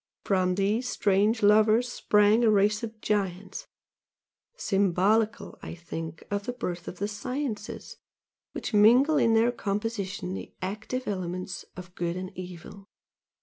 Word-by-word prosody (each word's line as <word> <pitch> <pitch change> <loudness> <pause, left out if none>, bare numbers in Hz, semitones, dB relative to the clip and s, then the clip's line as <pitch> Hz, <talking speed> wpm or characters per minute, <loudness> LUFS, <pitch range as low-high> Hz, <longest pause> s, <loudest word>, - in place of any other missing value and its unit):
From 185 -2 +1
these 210 +6 0
strange 205 +3 +2
lovers 215 +3 +5
sprang 210 -1 +3
a 225 - +5
race 210 0 +3
of 225 -1 -7
giants, 195 -2 -2 0.9
symbolical 205 - +1
I - - -7
think 165 -2 -7
of 200 0 -2
the 245 - -2
birth 180 -8 -5
of 180 - -7
the 200 - -2
sciences, 220 +1 -5 0.6
which - - -5
mingle 245 +9 +5
in 225 -1 +3
their 230 +2 +4
composition 200 -4 -3
the - - -8
active 215 +7 -4
elements 185 -1 -4
of 180 -1 -10
good 175 0 -3
and 185 +1 -7
evil. 185 +2 -9
205 Hz, 135 wpm, -27 LUFS, 185-225 Hz, 0.9 s, lovers